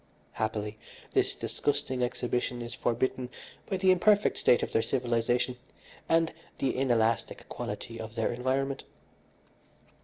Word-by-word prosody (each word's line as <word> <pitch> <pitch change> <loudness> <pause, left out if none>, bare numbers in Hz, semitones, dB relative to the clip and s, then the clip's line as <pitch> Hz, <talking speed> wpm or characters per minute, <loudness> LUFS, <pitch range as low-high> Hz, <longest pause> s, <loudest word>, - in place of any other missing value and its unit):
Happily, 110 -1 -2 0.3
this - - +2
disgusting 130 -3 -1
exhibition 120 0 -1
is 120 - -6
forbidden 125 +1 0 0.4
by 190 - 0
the 185 0 +5
imperfect 200 +3 +4
state 120 - +4
of - - -2
their 115 - +3
civilisation 120 +1 +1 0.5
and 165 0 +3 0.2
the 135 - 0
inelastic 115 -4 +1
quality 115 0 -5
of 110 0 -7
their - - +1
environment. 135 +2 -1
125 Hz, 120 wpm, -30 LUFS, 115-135 Hz, 0.5 s, the